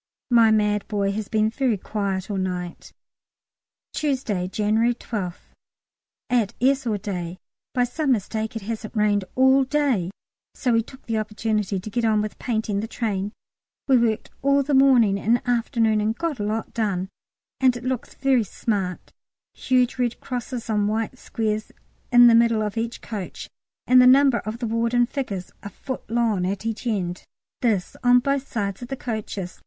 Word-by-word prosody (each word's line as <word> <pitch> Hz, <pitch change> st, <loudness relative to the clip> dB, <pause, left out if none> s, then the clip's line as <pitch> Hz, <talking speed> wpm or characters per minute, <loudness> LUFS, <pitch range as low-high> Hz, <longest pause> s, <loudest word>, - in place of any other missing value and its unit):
My 230 Hz, -2 st, +6 dB
mad 210 Hz, -1 st, +2 dB
boy 200 Hz, -2 st, 0 dB
has 210 Hz, 0 st, -4 dB
been 215 Hz, 0 st, +2 dB
very 250 Hz, -3 st, 0 dB
quiet 195 Hz, -1 st, -3 dB
all 200 Hz, -, -2 dB
night. 180 Hz, -2 st, -4 dB, 1.0 s
Tuesday, 255 Hz, -11 st, -1 dB
January 220 Hz, +4 st, +1 dB
12th. 195 Hz, -7 st, -6 dB, 0.8 s
At 235 Hz, -5 st, +1 dB
S. 265 Hz, 0 st, +2 dB
all 215 Hz, -2 st, +1 dB
day. 180 Hz, -3 st, -5 dB, 0.4 s
By 250 Hz, -, +3 dB
some 275 Hz, +4 st, -1 dB
mistake 220 Hz, +1 st, -3 dB
it 225 Hz, -, -5 dB
hasn't 220 Hz, +1 st, -5 dB
rained 205 Hz, -2 st, +2 dB
all 265 Hz, +1 st, +5 dB
day, 265 Hz, -, +1 dB, 0.5 s
so 250 Hz, -3 st, 0 dB
we 230 Hz, -, +4 dB
took 260 Hz, +4 st, -14 dB
the 225 Hz, -1 st, -1 dB
opportunity 210 Hz, -2 st, -1 dB
to 195 Hz, -, -7 dB
get 240 Hz, +1 st, -1 dB
on 220 Hz, -2 st, +3 dB
with 210 Hz, 0 st, -4 dB
painting 220 Hz, -4 st, -1 dB
the 220 Hz, -, -3 dB
train. 205 Hz, -4 st, -2 dB, 0.6 s
We 270 Hz, -, +5 dB
worked 230 Hz, -3 st, +1 dB
all 280 Hz, +1 st, +3 dB
the 285 Hz, +2 st, -2 dB
morning 250 Hz, -7 st, +5 dB
and 230 Hz, +5 st, +2 dB
afternoon 230 Hz, -2 st, +2 dB
and 220 Hz, +2 st, -1 dB
got 330 Hz, -7 st, -2 dB
a -, -, -1 dB
lot 215 Hz, +1 st, -3 dB
done, 200 Hz, -5 st, -1 dB, 0.5 s
and 255 Hz, -2 st, +3 dB
it 245 Hz, -, -10 dB
looks 255 Hz, -1 st, -3 dB
very 270 Hz, -3 st, +2 dB
smart: 195 Hz, -3 st, -3 dB, 0.4 s
huge 255 Hz, -1 st, +1 dB
red 240 Hz, -1 st, 0 dB
crosses 245 Hz, -1 st, -5 dB
on 210 Hz, -2 st, +1 dB
white 225 Hz, +4 st, -2 dB
squares 215 Hz, -1 st, -2 dB, 0.4 s
in 245 Hz, 0 st, +8 dB
the 235 Hz, -, +7 dB
middle 230 Hz, -1 st, +4 dB
of 210 Hz, 0 st, -3 dB
each 230 Hz, +1 st, -3 dB
coach, 205 Hz, -5 st, -6 dB, 0.4 s
and 255 Hz, 0 st, +7 dB
the 250 Hz, -, +7 dB
number 265 Hz, -1 st, +6 dB
of 215 Hz, +2 st, -5 dB
the 240 Hz, -, -3 dB
ward 230 Hz, +1 st, 0 dB
in 245 Hz, 0 st, +5 dB
figures 235 Hz, -9 st, -4 dB
a 200 Hz, -, -7 dB
foot 260 Hz, +5 st, -7 dB
long 225 Hz, -5 st, +1 dB
at 200 Hz, +3 st, -3 dB
each 225 Hz, +2 st, -3 dB
end: 185 Hz, -5 st, -2 dB, 0.4 s
this 215 Hz, -7 st, 0 dB
on 245 Hz, 0 st, +6 dB
both 275 Hz, +2 st, 0 dB
sides 200 Hz, -3 st, -2 dB
of 245 Hz, -, -6 dB
the 270 Hz, +1 st, -5 dB
coaches. 210 Hz, -6 st, -5 dB
225 Hz, 175 wpm, -23 LUFS, 205-245 Hz, 1.0 s, in